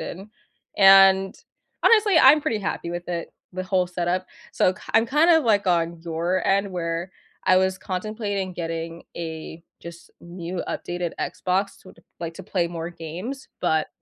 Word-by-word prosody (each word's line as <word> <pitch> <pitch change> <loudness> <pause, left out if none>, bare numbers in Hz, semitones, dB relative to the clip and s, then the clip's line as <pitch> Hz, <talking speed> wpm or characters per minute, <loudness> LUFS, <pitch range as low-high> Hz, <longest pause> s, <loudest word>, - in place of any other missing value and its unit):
in. 195 +4 -8 0.5
And, 195 -1 +6 0.5
honestly, 425 -5 +5
I'm 295 +3 +7
pretty 225 -6 -1
happy 180 -3 -3
with 175 +1 -6
it, 170 -1 -4 0.2
the 185 +1 -4
whole 185 -1 +1
setup. 180 +1 -1 0.3
So 185 - +2
k 210 - -17
I'm 225 +1 +5
kind 300 +7 +3
of 320 -2 +5
like 205 -3 +2
on 170 -2 +1
your 170 +3 -1
end 195 0 +2
where 170 0 -3 0.3
I 185 - +5
was 190 0 +2
contemplating 200 0 -3
getting 165 -1 -5
a 160 0 -7 0.2
just 170 0 -11
new 175 +1 -6
updated 175 -1 -4
Xbox 190 +2 -2
so 185 - -14
to - - -21 0.2
like, 165 -1 -5
to 190 - -9
play 175 -4 -1
more 165 -1 -5
games, 175 - -7
but, 160 -3 +1
185 Hz, 165 wpm, -24 LUFS, 170-195 Hz, 0.5 s, I'm